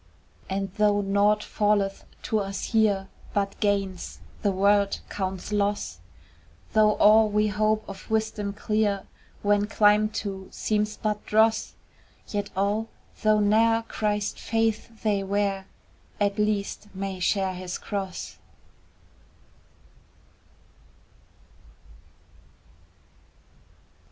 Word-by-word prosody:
And 195 0 -2
though 205 -1 +4
naught 205 +2 +2
falleth 205 -2 0 0.2
to 220 -3 0
us 195 -1 -4
here 205 -3 +3 0.3
But 200 -1 -1
gains 195 -3 -1 0.2
the 200 - +2
world 200 +1 +3
counts 190 0 -4
loss, 205 - -1 0.7
Though 215 -1 +5
all 215 +1 +6
we 210 +1 +2
hope 215 +1 +1
of 195 - -10
wisdom 220 -2 -1
clear 210 -1 0 0.4
When 205 0 +3
climbed 210 0 +3
to 195 -2 -4
seems 210 0 -1
but 210 -1 -2
dross, 220 +1 +2 0.5
Yet 205 -1 -3
all, 205 +3 0 0.3
though 215 0 +4
ne'er 225 +2 +3
Christ's 210 -1 -2
faith 225 0 -1
they 205 -2 +2
wear, 195 0 -1 0.5
At 205 0 +1
least 210 -1 -1
may 190 -1 -4
share 190 +1 +1
his 180 0 -5
cross. 195 -3 -5
205 Hz, 100 wpm, -26 LUFS, 195-215 Hz, 0.7 s, all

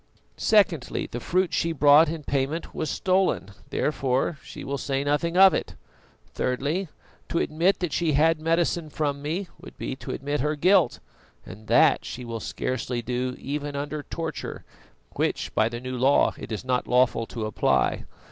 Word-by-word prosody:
Secondly, 195 - +2
the 120 - -4
fruit 185 +7 0
she 165 - +1
brought 145 +1 +6
in 160 -1 -5
payment 140 +4 -2
was 155 - -3
stolen, 185 - +1 0.2
therefore 135 +1 0
she - - -9
will 140 0 -3
say 135 0 -1
nothing 155 +4 0
of 190 0 +8
it. - - -3 0.6
Thirdly, 145 +9 -1 0.4
to - - -1
admit 170 +5 +2
that 175 -4 -2
she 165 -3 +1
had 160 +2 +3
medicine 165 0 0
from 145 -2 -2
me 170 +7 -3
would - - -12
be 130 - -4
to 125 - -10
admit 145 +2 -2
her 150 +4 0
guilt, 185 +7 +3 0.5
and 110 +1 -11
that - - +4
she 125 +1 -7
will 115 -1 -5
scarcely 125 +2 -3
do 125 +1 -2
even 145 +1 -4
under 145 +1 -3
torture, 165 +2 -6 0.5
which - - -1
by 110 +1 +2
the 120 0 -5
new 130 +1 -5
law 130 +3 +3
it - - -9
is 110 +3 -4
not 125 -1 0
lawful 125 -2 +2
to 115 -3 -4
apply. 110 - +1
145 Hz, 165 wpm, -25 LUFS, 125-165 Hz, 0.6 s, of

